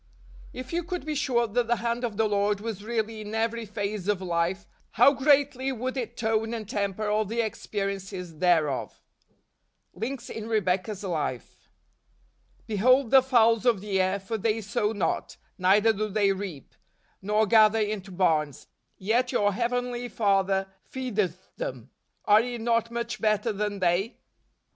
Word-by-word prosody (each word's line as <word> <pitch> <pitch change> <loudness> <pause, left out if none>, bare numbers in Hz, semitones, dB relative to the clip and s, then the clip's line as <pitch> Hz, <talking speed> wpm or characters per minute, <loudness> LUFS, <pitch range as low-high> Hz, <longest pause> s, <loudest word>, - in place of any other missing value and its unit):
9. 255 - -4
If 255 - -12
you 345 - +1
could 360 0 -5
be 310 - -2
sure 265 -5 +1
that 230 +2 -1
the 240 - +2
hand 235 +2 -2
of 225 -4 -3
the 220 0 +3
Lord 205 0 +1
was 210 -2 -5
really 220 -1 -2
iu 210 0 -7
every 230 0 -1
phase 205 -2 -4
of 205 -2 +1
life, 180 +2 -1 0.3
how 280 - +6
greatly 275 -1 +2
would 255 +1 -3
it 240 -2 -4
tone 225 0 0
and 220 -3 -6
temper 200 +1 -2
all 210 +1 +2
the 225 +3 -1
experiences 195 -5 -4
thereof! 160 -7 +1 0.9
Links 240 +5 -5
in 220 -1 -6
Rebecca's 195 -1 0
Life. 155 - -4 0.5
" - - -37
Behold 240 +4 +3
the 265 -1 +8
fowls 230 -4 +3
of 240 -5 +3
the 195 -1 0
air: 190 +2 0
for 215 +3 -4
they 220 +2 0
sow 210 0 -1
not, 210 - -2 0.2
neither 205 +5 +4
do 215 +1 -2
they 200 -1 +2
reap, 190 -8 -6 0.5
nor 210 +2 +2
gather 215 0 +5
into 210 -2 -2
barns; 160 -6 0 0.3
yet 235 +6 +1
your 205 0 +2
Heavenly 245 +2 -2
Father 195 -3 +1 0.3
fcedeth 210 -9 -2
them. - - -6 0.3
Are 210 +1 +6
ye 245 0 -4
not 230 0 0
much 235 +1 -4
better 215 +1 +1
than 205 0 -2
they 185 +5 0
215 Hz, 160 wpm, -27 LUFS, 195-235 Hz, 0.9 s, the